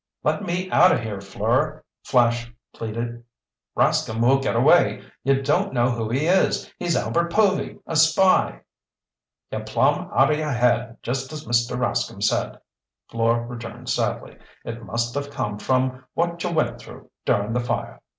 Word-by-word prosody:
"Let -, -, +1 dB
me 180 Hz, -1 st, -2 dB
out 185 Hz, -, +6 dB
of -, -, +1 dB
here, 105 Hz, -4 st, -5 dB
Fleur!" 120 Hz, +10 st, -1 dB, 0.2 s
Flash 120 Hz, -2 st, +2 dB, 0.2 s
pleaded. 115 Hz, +1 st, -5 dB, 0.5 s
"Rascomb 110 Hz, +1 st, +1 dB
will 135 Hz, +1 st, +5 dB
get 135 Hz, -, -1 dB
away! -, -, +4 dB, 0.2 s
You 135 Hz, +1 st, +2 dB
don't 135 Hz, -, +1 dB
know 120 Hz, +1 st, +3 dB
who 115 Hz, -2 st, -3 dB
he 135 Hz, +6 st, 0 dB
is! 185 Hz, +3 st, +1 dB
He's 175 Hz, -2 st, 0 dB
Albert 170 Hz, 0 st, 0 dB
Povy, 200 Hz, -1 st, +1 dB
a 165 Hz, -, -4 dB
spy—" 160 Hz, -, +4 dB, 0.9 s
"You're -, -, -4 dB
plumb -, -, +1 dB
out -, -, +4 dB
o' -, -, +3 dB
your 150 Hz, -1 st, -1 dB
head 120 Hz, -1 st, +1 dB
just 130 Hz, +3 st, -3 dB
as 155 Hz, 0 st, -7 dB
Mr. 120 Hz, 0 st, +1 dB
Rascomb 120 Hz, -1 st, -1 dB
said," -, -, 0 dB, 0.5 s
Fleur 115 Hz, +1 st, +1 dB
returned 115 Hz, -2 st, -8 dB
sadly. -, -, -2 dB, 0.3 s
"It 115 Hz, 0 st, -6 dB
must 115 Hz, +4 st, -2 dB
of 145 Hz, 0 st, -3 dB
come 105 Hz, -7 st, -4 dB
from 130 Hz, +1 st, 0 dB
what 170 Hz, 0 st, -1 dB
you 180 Hz, -, -1 dB
went 160 Hz, -2 st, 0 dB
through -, -, -13 dB
during 105 Hz, +2 st, +1 dB
the 125 Hz, -, +1 dB
fire. 120 Hz, -, -3 dB
125 Hz, 160 wpm, -23 LUFS, 115-155 Hz, 0.9 s, out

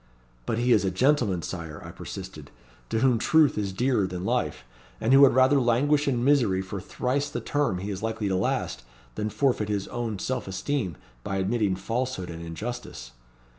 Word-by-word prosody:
'But 110 Hz, -, 0 dB
he 120 Hz, +1 st, +1 dB
is 105 Hz, -, +5 dB
a 95 Hz, -, +1 dB
gentleman, 100 Hz, -, +2 dB
Sire,' 80 Hz, -3 st, -6 dB
I -, -, -8 dB
persisted, -, -, -8 dB, 0.4 s
'to 110 Hz, -, 0 dB
whom 125 Hz, -4 st, +3 dB
truth 155 Hz, +3 st, +4 dB
is 100 Hz, -2 st, -2 dB
dearer 115 Hz, -1 st, +1 dB
than 90 Hz, 0 st, -5 dB
life, -, -, -1 dB, 0.4 s
and 115 Hz, -, +2 dB
who 135 Hz, -, +8 dB
would 140 Hz, -3 st, +7 dB
rather 130 Hz, +2 st, +5 dB
languish 145 Hz, +5 st, +2 dB
in 120 Hz, -3 st, +1 dB
misery 125 Hz, -9 st, +3 dB
for 95 Hz, 0 st, -6 dB
thrice 135 Hz, +8 st, -1 dB
the -, -, -3 dB
term 145 Hz, -10 st, 0 dB
he 100 Hz, +3 st, -4 dB
is 95 Hz, -, -5 dB
likely 110 Hz, -1 st, -2 dB
to 95 Hz, -, 0 dB
last, 60 Hz, -8 st, -1 dB, 0.3 s
than 105 Hz, -, -2 dB
forfeit 110 Hz, -1 st, 0 dB
his 100 Hz, -2 st, -1 dB
own 115 Hz, -3 st, -3 dB
self 130 Hz, +4 st, -3 dB
esteem 95 Hz, -, -2 dB, 0.3 s
by 95 Hz, -, -3 dB
admitting 100 Hz, 0 st, +1 dB
falsehood 115 Hz, -1 st, -3 dB
and 85 Hz, 0 st, -7 dB
injustice.' 85 Hz, -, -6 dB
110 Hz, 185 wpm, -26 LUFS, 95-130 Hz, 0.4 s, who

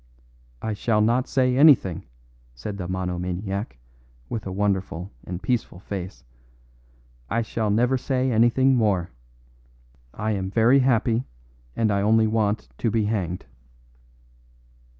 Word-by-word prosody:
"I 110 Hz, -, -1 dB
shall 105 Hz, +1 st, 0 dB
not 120 Hz, +5 st, +2 dB
say 130 Hz, -2 st, +2 dB
anything," 130 Hz, -, +4 dB, 0.5 s
said 100 Hz, +12 st, -6 dB
the 90 Hz, -, -4 dB
monomaniac, 90 Hz, -, -3 dB, 0.5 s
with 110 Hz, -3 st, -4 dB
a -, -, -4 dB
wonderful 95 Hz, -2 st, -2 dB, 0.2 s
and 90 Hz, 0 st, -6 dB
peaceful 120 Hz, -7 st, -1 dB
face. 95 Hz, -4 st, -7 dB, 1.1 s
"I 115 Hz, +2 st, 0 dB
shall 110 Hz, -1 st, -2 dB
never 125 Hz, +5 st, +2 dB
say 130 Hz, 0 st, 0 dB
anything 120 Hz, +4 st, +4 dB
more. 100 Hz, -7 st, +1 dB, 1.0 s
I 110 Hz, +9 st, -3 dB
am 95 Hz, -2 st, -2 dB
very 115 Hz, +6 st, +4 dB
happy, 125 Hz, -2 st, +2 dB, 0.5 s
and 110 Hz, -2 st, +1 dB
I 100 Hz, 0 st, +1 dB
only 110 Hz, +2 st, +4 dB
want 110 Hz, -1 st, 0 dB
to 115 Hz, -, +1 dB
be 110 Hz, -1 st, +1 dB
hanged." 95 Hz, -5 st, -2 dB
110 Hz, 125 wpm, -24 LUFS, 95-120 Hz, 1.1 s, anything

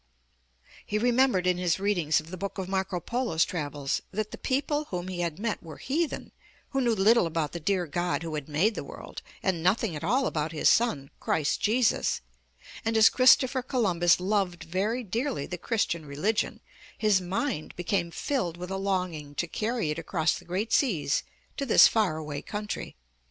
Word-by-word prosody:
He 210 Hz, -, -2 dB
remembered 245 Hz, -4 st, +3 dB
in 180 Hz, -1 st, +2 dB
his 180 Hz, 0 st, +1 dB
readings 180 Hz, -7 st, +2 dB
of 155 Hz, +2 st, -11 dB
the 185 Hz, -, -5 dB
book 200 Hz, +3 st, -5 dB
of 190 Hz, -2 st, -3 dB
Marco 190 Hz, -1 st, -1 dB
Polo's 235 Hz, -5 st, 0 dB
travels, 145 Hz, -4 st, -3 dB
that 215 Hz, +2 st, -3 dB
the -, -, -7 dB
people 290 Hz, +3 st, 0 dB
whom 180 Hz, -6 st, -5 dB
he 180 Hz, -1 st, -5 dB
had 170 Hz, -3 st, -2 dB
met 215 Hz, +1 st, -2 dB
were 160 Hz, -3 st, -10 dB
heathen, 310 Hz, +4 st, -2 dB, 0.4 s
who 270 Hz, -, +1 dB
knew 235 Hz, -3 st, +2 dB
little 210 Hz, -1 st, +4 dB
about 160 Hz, -2 st, -2 dB
the 170 Hz, -, -5 dB
dear 180 Hz, +2 st, 0 dB
God 170 Hz, -1 st, -1 dB
who 165 Hz, -1 st, -5 dB
had 150 Hz, -1 st, -4 dB
made 175 Hz, +10 st, +2 dB
the -, -, -5 dB
world, -, -, -9 dB, 0.2 s
and 185 Hz, -4 st, 0 dB
nothing 185 Hz, +1 st, +1 dB
at 150 Hz, -, -6 dB
all 255 Hz, +10 st, +2 dB
about 155 Hz, +1 st, -2 dB
His 155 Hz, -, +3 dB
son, 150 Hz, -, +1 dB
Christ 150 Hz, -2 st, 0 dB
Jesus, 225 Hz, +1 st, +2 dB, 0.6 s
and 225 Hz, -1 st, +1 dB
as 220 Hz, 0 st, +8 dB
Christopher 260 Hz, 0 st, +5 dB
Columbus 185 Hz, -10 st, +2 dB
loved 185 Hz, -2 st, 0 dB
very 205 Hz, +8 st, -1 dB
dearly 230 Hz, -, -2 dB
the 180 Hz, -, -6 dB
Christian 170 Hz, -8 st, -1 dB
religion, 185 Hz, +11 st, -1 dB, 0.4 s
his 210 Hz, -3 st, +3 dB
mind 185 Hz, -, -3 dB
became 175 Hz, 0 st, -1 dB
filled 175 Hz, -, -2 dB
with 180 Hz, +1 st, -6 dB
a 190 Hz, -, -1 dB
longing 180 Hz, -7 st, -2 dB
to 175 Hz, -, 0 dB
carry 215 Hz, -1 st, -2 dB
it 150 Hz, -, -3 dB
across 165 Hz, 0 st, 0 dB
the 175 Hz, -, -8 dB
great 190 Hz, +6 st, -2 dB
seas 175 Hz, -, +2 dB, 0.4 s
to 280 Hz, -, -1 dB
this -, -, +8 dB
far 205 Hz, -8 st, +1 dB
away 150 Hz, -2 st, -5 dB
country. 210 Hz, -1 st, -5 dB
185 Hz, 185 wpm, -28 LUFS, 165-225 Hz, 0.6 s, as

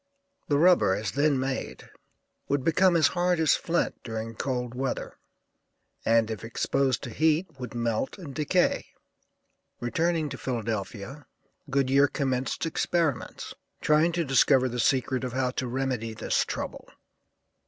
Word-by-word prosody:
The 145 Hz, -, +2 dB
rubber, 170 Hz, -, +5 dB
as 105 Hz, -1 st, -3 dB
then 145 Hz, -1 st, +2 dB
made, 130 Hz, 0 st, -4 dB, 0.6 s
would 140 Hz, -1 st, 0 dB
become 180 Hz, +3 st, +4 dB
as 160 Hz, -, +5 dB
hard 175 Hz, -1 st, +1 dB
as 160 Hz, -2 st, +4 dB
flint 170 Hz, +1 st, -1 dB
during 115 Hz, 0 st, -5 dB
cold 125 Hz, 0 st, -3 dB
weather, 130 Hz, +1 st, -4 dB, 0.8 s
and 115 Hz, -1 st, +3 dB
if 110 Hz, -, -6 dB
exposed 130 Hz, +2 st, 0 dB
to 120 Hz, -, -6 dB
heat 160 Hz, +3 st, +1 dB
would 125 Hz, -2 st, -7 dB
melt 115 Hz, -, -1 dB
and 160 Hz, -8 st, -8 dB
decay. 155 Hz, +6 st, +1 dB, 0.9 s
Returning 160 Hz, +5 st, 0 dB
to -, -, -7 dB
Philadelphia, 115 Hz, +2 st, -4 dB, 0.4 s
Goodyear 135 Hz, +1 st, +3 dB
commenced 130 Hz, -1 st, -2 dB
experiments, 165 Hz, -3 st, -1 dB, 0.3 s
trying 155 Hz, +3 st, +3 dB
to 170 Hz, -1 st, 0 dB
discover 135 Hz, -1 st, +4 dB
the 125 Hz, 0 st, -4 dB
secret 130 Hz, 0 st, +1 dB
of 125 Hz, -2 st, -3 dB
how 130 Hz, -1 st, 0 dB
to 130 Hz, 0 st, -3 dB
remedy 125 Hz, -3 st, -2 dB
this -, -, 0 dB
trouble. -, -, -6 dB
135 Hz, 135 wpm, -27 LUFS, 120-155 Hz, 0.9 s, rubber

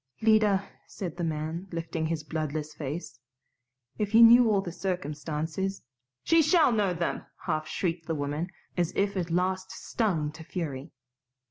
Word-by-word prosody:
"Lida," 210 Hz, -3 st, +4 dB, 0.2 s
said 175 Hz, -5 st, -6 dB
the 175 Hz, -, -4 dB
man, 160 Hz, +3 st, -3 dB
lifting 165 Hz, -1 st, -2 dB
his 160 Hz, -1 st, -2 dB
bloodless 155 Hz, 0 st, -3 dB
face, 150 Hz, -3 st, -6 dB, 0.8 s
"if 210 Hz, +1 st, 0 dB
you 230 Hz, -, +9 dB
knew 235 Hz, 0 st, +8 dB
all 205 Hz, -2 st, +3 dB
the 180 Hz, -3 st, -5 dB
circumstances 165 Hz, +1 st, -3 dB, 0.2 s
" 130 Hz, 0 st, -59 dB
"She 330 Hz, 0 st, +5 dB
shall 315 Hz, -2 st, +5 dB
know 210 Hz, -5 st, +2 dB
them!" 170 Hz, 0 st, -2 dB, 0.2 s
half 155 Hz, 0 st, -1 dB
shrieked 165 Hz, -2 st, -2 dB
the 165 Hz, -, -1 dB
woman, 145 Hz, +4 st, -2 dB, 0.3 s
as 175 Hz, -2 st, +1 dB
if 200 Hz, 0 st, +1 dB
at 175 Hz, -2 st, -2 dB
last 185 Hz, +2 st, 0 dB
stung 170 Hz, -10 st, -1 dB
to 160 Hz, +1 st, -11 dB
fury. 155 Hz, -4 st, -5 dB
170 Hz, 155 wpm, -28 LUFS, 155-195 Hz, 0.8 s, you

